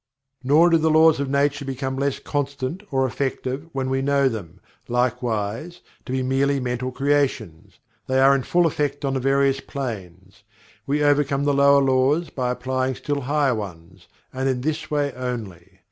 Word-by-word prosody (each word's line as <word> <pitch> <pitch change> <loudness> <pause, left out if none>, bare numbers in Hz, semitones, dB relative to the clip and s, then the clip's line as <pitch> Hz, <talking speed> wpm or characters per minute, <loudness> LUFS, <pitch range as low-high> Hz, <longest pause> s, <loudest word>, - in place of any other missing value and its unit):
Nor 155 +6 +5
do 165 - +6
the 160 0 +2
Laws 160 -1 +5
of 140 -1 -2
Nature 140 +1 +1
become 135 0 -4
less 140 0 -1
constant 140 +3 -3
or 135 -2 +1
effective, 135 +3 -3
when 135 -2 -2
we 135 0 0
know 140 0 +2
them, 95 -7 -5 0.3
likewise, 125 +4 -2 0.3
to - - -5
be 130 0 0
merely 135 +2 +1
mental 125 0 -3
creations. 135 - -1 0.3
They 130 0 +1
are 135 +1 +6
in 135 - +1
full 175 +6 +2
effect 145 -2 -1
on 135 - 0
the 135 - 0
various 135 +1 +2
planes. 95 -10 -7 0.5
We 145 +2 +1
overcome 145 -1 +2
the 145 0 +2
lower 140 0 +5
laws, 135 +5 +2
by 125 -2 -2
applying 130 +1 -1
still 145 +2 -3
higher 140 0 +1
ones 90 -4 -8 0.3
and 130 +1 -1
in 125 -2 -1
this 155 +3 -3
way 145 -2 0
only. 105 -8 -6
135 Hz, 170 wpm, -23 LUFS, 125-140 Hz, 0.5 s, do